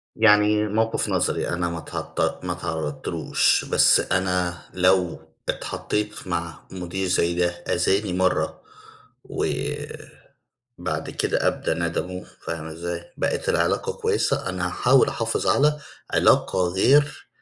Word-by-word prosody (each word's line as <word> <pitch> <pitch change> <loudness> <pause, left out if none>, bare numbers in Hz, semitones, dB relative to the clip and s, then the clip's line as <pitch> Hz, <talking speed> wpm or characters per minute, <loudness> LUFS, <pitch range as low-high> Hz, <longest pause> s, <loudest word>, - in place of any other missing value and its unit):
يعني 105 -1 +4
موقِف 110 +2 0
نظري - - 0
أنا 85 0 -1
ما 85 0 -4
تعط 85 - -3
ما 90 - -1
تعرّضتلوش 80 -4 0
بس - - +5
أنا 90 -1 0
لو 90 -1 +2 0.3
اتحطّيت 105 -1 -3
مع 85 -2 -3
مدير 95 +1 -3
زي 85 -1 +1
ده 90 0 +2
أذاني 95 +3 0
مرّة 90 0 0 0.6
وبعد - - -5 0.8
كده - - +1
أبدى - - -1
ندمه، 85 +2 -3
فاهمة 80 -1 -5
إزاي 85 +1 -6
بقت - - -1
العلاقة - - +1
كويّسة، - - 0
أنا 90 -1 -2
هاحاول 125 +8 +4
أحافظ 115 -1 -2
على 150 +1 +3 0.3
علاقة 90 -1 +3
غير 140 +11 +2
90 Hz, 115 wpm, -24 LUFS, 85-105 Hz, 0.8 s, بس